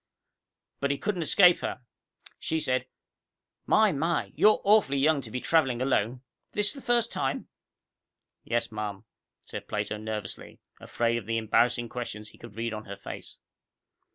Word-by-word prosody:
But 140 - 0
he 140 - 0
couldn't 200 0 -2
escape 175 +2 +6
her. - - -4 0.6
She 160 - -1
said, 130 -3 0 0.8
"My, 215 -1 +5
my, 165 +4 -1
you're 215 0 +5
awfully 205 -9 +4
young 145 +1 +3
to 120 - -9
be 125 - -3
traveling 135 -5 +2
alone. 125 -1 0 0.3
This 210 0 +1
the 275 - -10
first 240 -2 +1
time?" 135 +1 -2 0.9
"Yes, 120 -1 -1
ma'am," 105 -2 -5 0.4
said - - -8
Plato 105 - -2
nervously, 105 -2 -6 0.2
afraid 115 0 0
of 110 -4 -6
the 115 0 0
embarrassing 120 +2 +2
questions 110 -3 -6
he - - -19
could 100 - -12
read 115 0 -3
on 110 0 -6
her 100 0 -7
face. - - -9
130 Hz, 155 wpm, -28 LUFS, 110-165 Hz, 0.9 s, escape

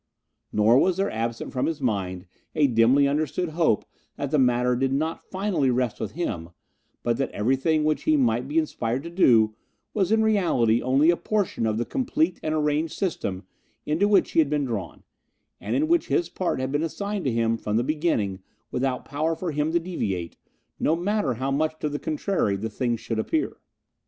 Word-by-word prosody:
Nor 110 +4 +4
was 185 +2 +2
there 195 +1 0
absent 115 +1 -3
from 130 - 0
his 160 -2 -2
mind 95 -7 -2 0.3
a 155 -2 +4
dimly 125 +3 +4
understood 155 +4 -1
hope 160 - +1 0.3
that 140 -1 -4
the 150 - +3
matter 125 -1 +3
did 135 +2 0
not 155 +4 -1
finally 185 -8 0
rest 125 -2 0
with - - -4
him, 95 - -3 0.5
but 120 -1 +1
that 135 - -1
everything 135 +8 +1
which 155 0 0
he 155 - +4
might 120 -1 +1
be 150 +3 -2
inspired 130 -5 -1
to 170 - -7
do 115 - +4 0.4
was 195 -2 +1
in 220 0 +4
reality 165 - +2
only 135 +6 +4
a - - +1
portion 200 - -1
of 110 -1 0
the 120 - -1
complete 275 +5 0
and 155 0 -1
arranged 150 +1 0
system 100 - -2 0.4
into 165 +7 +2
which 200 -3 +3
he - - +2
had 155 -3 +4
been 145 -1 0
drawn, 100 -9 -5 0.6
and - - -3
in 305 +3 +2
which 340 +1 +2
his 350 - +1
part 185 -7 -2
had 130 0 -2
been 145 +1 0
assigned 200 +4 -3
to 130 - +2
him 115 0 +1
from 105 -1 -2
the 120 - +2
beginning 135 - 0 0.3
without 130 0 -1
power 155 +3 -1
for 175 0 -3
him 150 +1 0
to 170 - +2
deviate, 100 - -3 0.4
no 160 - +2
matter 175 - 0
how 130 +4 -2
much 155 +3 0
to 155 - -2
the 145 0 -3
contrary 155 - 0
the 110 +3 -4
thing 120 +1 -1
should 115 0 -4
appear. 310 - -1
145 Hz, 195 wpm, -25 LUFS, 115-165 Hz, 0.6 s, Nor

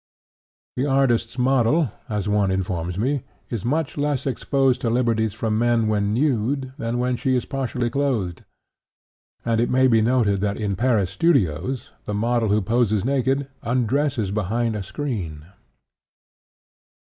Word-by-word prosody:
The 130 +3 +1
artist's 125 -4 +1
model, 130 - +2 0.2
as 105 -3 -2
one 105 -1 +2
informs 90 -2 -2
me, 130 +6 0 0.3
is 115 -5 -3
much 150 +5 -1
less 145 -2 0
exposed 135 -1 +1
to 120 - 0
liberties 115 -3 +1
from 110 -1 -1
men 120 -2 +2
when 105 -1 +1
nude 130 +1 0
than 115 +1 -2
when 125 0 0
she 130 +1 +1
is 125 - 0
partially 130 -3 -2
clothed, 120 -12 -1 1.0
and 115 -1 +2
it 120 - +1
may 130 +1 +4
be 115 -3 +4
noted 110 -4 +2
that 100 0 -1
in 100 -2 -1
Paris 110 -4 +1
studios 100 - 0
the 105 - -3
model 115 +1 +1
who 105 0 +2
poses 110 -1 +1
naked 135 +1 +1
undresses 125 -2 0
behind 110 +3 -1
a 105 - -3
screen. 95 - -5
115 Hz, 145 wpm, -23 LUFS, 105-130 Hz, 1.0 s, may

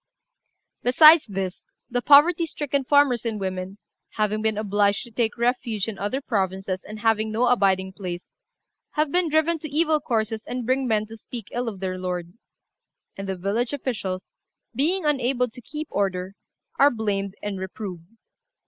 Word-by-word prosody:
"Besides 305 +5 +7
this, 190 -2 -5 0.2
the 245 0 -1
poverty 320 +5 +6
stricken 285 -2 -2
farmers 275 -3 +3
and 225 -3 -2
women, 190 0 -4 0.4
having 215 0 0
been 220 -1 0
obliged 205 -1 +1
to 240 - -12
take 225 0 -1
refuge 235 -3 0
in 220 -3 -5
other 230 +7 -2
provinces, 190 -5 -2
and 215 0 -9
having 220 -1 +2
no 230 +3 +2
abiding 190 -6 +2
place, 180 -3 -6 0.7
have 300 -1 +1
been 355 -1 +2
driven 315 +2 +2
to 310 - -6
evil 310 +1 +2
courses 225 -4 -1
and 250 -1 -4
bring 260 +2 +1
men 215 -2 +1
to 225 +1 -11
speak 225 -1 -9
ill 245 0 -2
of 195 -4 -10
their 185 -1 -3
lord; 180 -1 -4 0.8
and 195 0 -6
the 190 - -1
village 205 +8 -1
officials, 200 -9 -4 0.4
being 320 +8 0
unable 260 -3 +1
to 245 +1 -12
keep 300 +6 -6
order, 190 -1 -1 0.5
are 280 - +7
blamed 200 -5 -2
and 205 -2 -3
reproved. 190 -3 -7
220 Hz, 160 wpm, -24 LUFS, 195-265 Hz, 0.8 s, Besides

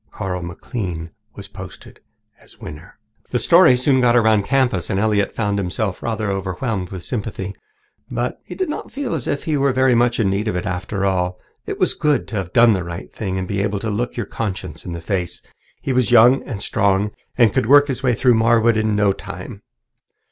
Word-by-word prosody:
Carl 95 -3 -4
McLean 85 -1 -5 0.2
was - - -9
posted - - -11 0.4
as - - -17
winner. 75 +5 -10 0.3
The 125 - 0
story 165 -1 +6
soon 130 +1 +3
got 120 -1 +4
around 110 -3 +4
the - - -11
campus, 125 -10 +1
and 95 - 0
Elliott 105 -1 +1
found 105 -2 0
himself 100 +1 -2
rather 110 -3 -2
overwhelmed 95 0 -3
with 95 -3 -7
sympathy, 100 -4 -4 0.6
but - - -3
he - - -9
did 375 - -1
not 300 - -5
feel 275 -8 -3
as 150 -7 -3
if 145 - -2
he 155 -2 0
were 140 0 +2
very 130 0 +3
much 120 0 +2
in 110 - +2
need 100 +3 -1
of 105 - -1
it 90 - -2
after 95 +1 -2
all. 90 -1 0 0.3
It - - -3
was - - +2
good 150 -1 +1
to 115 - -5
have 95 -2 -4
done 120 -1 +6
the 95 -3 -1
right 85 0 -8
thing 95 -3 -3
and 95 -1 -3
be 100 0 -1
able 105 0 -1
to 110 +2 -3
look 120 +5 -3
your 120 - -2
conscience 95 -7 -5
in 90 - -5
the 85 - -6
face. 90 -1 -3 0.4
He 135 - -1
was 125 -2 +2
young 120 +2 +6
and 105 -6 -5
strong 100 -1 +1 0.3
and 115 -5 +4
could - - +1
work 145 +2 +7
his 135 -3 -2
own 130 -2 0
way - - +3
through 125 +2 +4
Marwood 115 0 +3
in 110 -1 +1 0.2
time. - - -9
110 Hz, 215 wpm, -20 LUFS, 95-125 Hz, 0.6 s, work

